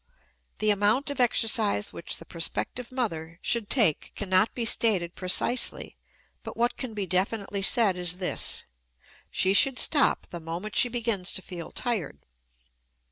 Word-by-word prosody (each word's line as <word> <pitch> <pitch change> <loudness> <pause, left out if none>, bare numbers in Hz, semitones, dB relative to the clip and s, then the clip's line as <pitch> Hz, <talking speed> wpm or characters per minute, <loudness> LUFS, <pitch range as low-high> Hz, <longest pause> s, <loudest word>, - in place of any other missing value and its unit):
The 215 0 +2
amount 210 +8 +1
of 285 - -6
exercise 220 -4 +2
which 170 - -6
the - - -11
prospective 180 +8 -2
mother 170 -10 -4
should 230 -4 0
take 210 - +2
cannot 190 +1 +2
be 235 - -2
stated 195 -7 +3
precisely, 190 +7 0 0.5
but - - -9
what 240 +1 +1
can 245 -5 -7
be 205 -2 -2
definitely 195 +2 -1
said 205 -1 +2
is 180 0 -2
this 185 -1 -3 0.7
she 190 +1 +1
should 260 +5 +4
stop 290 -3 +3
the 175 - -6
moment 170 +6 -6
she 245 - +4
begins 230 -6 -1
to 190 - -6
feel 175 -3 -8
tired. 220 - -2
205 Hz, 145 wpm, -27 LUFS, 180-235 Hz, 0.7 s, should